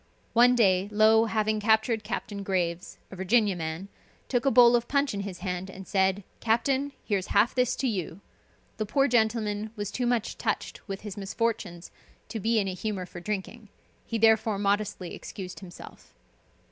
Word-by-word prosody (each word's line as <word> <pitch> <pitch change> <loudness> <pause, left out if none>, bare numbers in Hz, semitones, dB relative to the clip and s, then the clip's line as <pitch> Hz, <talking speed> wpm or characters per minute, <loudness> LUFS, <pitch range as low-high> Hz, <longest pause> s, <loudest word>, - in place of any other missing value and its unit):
One 245 +2 +6
day 195 -4 +3
Low 220 +1 +5
having 215 -1 0
captured 220 +1 +2
Captain 205 -1 -4
Graves, 180 -3 -2
a - - -8
Virginia 200 +2 +2
man, 165 +2 -4 0.4
took 250 +1 +1
a - - +7
bowl 245 -2 +7
of 240 0 0
punch 280 -2 +1
in 200 - -3
his 195 -3 -6
hand, 180 0 -3
and 190 0 -10
said, 190 0 +1 0.2
"Captain, 265 +5 +1
here's 200 -4 -1
half 210 +4 +4
this 250 -2 +1
to 270 - -1
you." 185 -5 -3 0.6
The 215 - -2
poor 275 +6 +2
gentleman 220 -3 +1
was 205 -2 -4
too 250 -1 -1
much 240 -2 -1
touched - - -3
with 195 -1 -5
his 210 -1 -7
misfortunes 195 -4 -3 0.4
to 225 - -4
be 225 +3 +1
in 200 -2 +1
a 190 - -2
humor 185 0 -3
for 175 - -10
drinking, 210 +3 -5 0.3
he 230 - -3
therefore 220 -1 +3
modestly 200 -2 -1
excused 185 -2 -8
himself. 180 -3 -13
210 Hz, 170 wpm, -27 LUFS, 190-230 Hz, 0.6 s, a